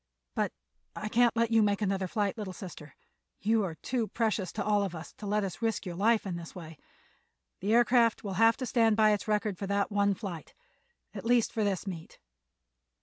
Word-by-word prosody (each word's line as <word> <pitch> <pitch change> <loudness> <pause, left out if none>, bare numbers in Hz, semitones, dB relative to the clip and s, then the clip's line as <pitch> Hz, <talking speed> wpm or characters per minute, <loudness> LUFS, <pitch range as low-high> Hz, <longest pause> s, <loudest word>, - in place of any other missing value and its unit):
But - - 0 0.4
I 215 - -4
can't 235 +1 +3
let 230 0 +2
you 225 -1 +5
make 205 -1 +2
another 195 -2 0
flight, 205 +2 -1
little 205 -5 -5
sister. 155 -6 -10 0.4
You 220 +1 +2
are 170 -4 -3
too 235 +6 -2
precious 215 -6 -1
to 205 - -2
us - - -6
all 205 -2 +2
for 170 - -8
us 160 - -10
to 210 - -8
let 210 +1 +1
you 195 - -1
risk 225 -2 -1
your 180 - -4
life 215 +5 +2
in 180 -3 -3
this 170 -1 -9
way. 165 -4 -10 0.8
The 205 +4 +1
aircraft 240 -1 +4
will 200 -2 -4
have 225 0 +6
to 255 - -3
stand 225 -3 +3
by 215 -1 +5
its 210 0 -1
record 210 -3 0
for 195 - -3
that 200 +1 0
one 200 -1 +2
flight—at 475 - -10
least 235 -1 +3
for 225 -2 0
this 200 -2 -1
meet." 170 -5 -7
210 Hz, 205 wpm, -30 LUFS, 190-225 Hz, 0.8 s, have